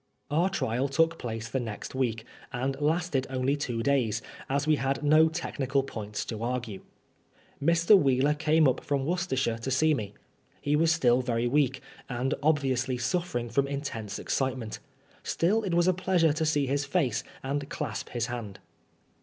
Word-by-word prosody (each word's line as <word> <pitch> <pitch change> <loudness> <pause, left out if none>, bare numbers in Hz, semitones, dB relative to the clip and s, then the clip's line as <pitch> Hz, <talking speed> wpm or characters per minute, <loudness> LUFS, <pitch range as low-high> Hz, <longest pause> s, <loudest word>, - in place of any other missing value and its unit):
Our 170 +6 +3
trial 130 -8 -1
took 165 +4 +1
place 115 -1 -4
the 125 +3 -2
next 110 -4 -6
week, 115 -4 -1 0.3
and 135 +2 -1
lasted 155 -3 +1
only 130 +1 0
two 120 -5 -3
days, 120 -4 +1 0.3
as 140 +2 0
we 155 -1 +3
had 135 +2 -1
no 155 +2 +5
technical 140 -5 -1
points 105 -5 -5
to 110 -2 -5
argue. 120 -4 -3 0.4
' - - -18
Mr. 170 +5 +5
Wheeler 140 -3 +3
came 155 0 +3
up 130 - 0
from 140 -2 -1
Worcestershire 140 -9 0
to 120 - -4
see 155 +4 +3
me. 105 -7 -4 0.4
He 145 +1 +1
was 165 +2 +3
still 130 -7 +3
very 120 -1 0
weak, 135 0 +1 0.3
and 125 +2 -1
obviously 135 -4 +1
suffering 120 -3 -1
from 135 +4 +1
in 140 0 -3
tense 110 -8 -5
excitement. 130 -5 -2 0.4
Still 200 +7 +1
it 190 -5 -1
was 175 +1 +3
a 185 - +5
pleasure 175 -3 +2
to 160 +1 0
see 145 -2 +2
his 140 +2 0
face 140 -6 0 0.2
and 140 +1 -2
clasp 135 -8 -4
his 120 -1 -1
hand. 115 -5 -6
135 Hz, 170 wpm, -28 LUFS, 120-155 Hz, 0.4 s, no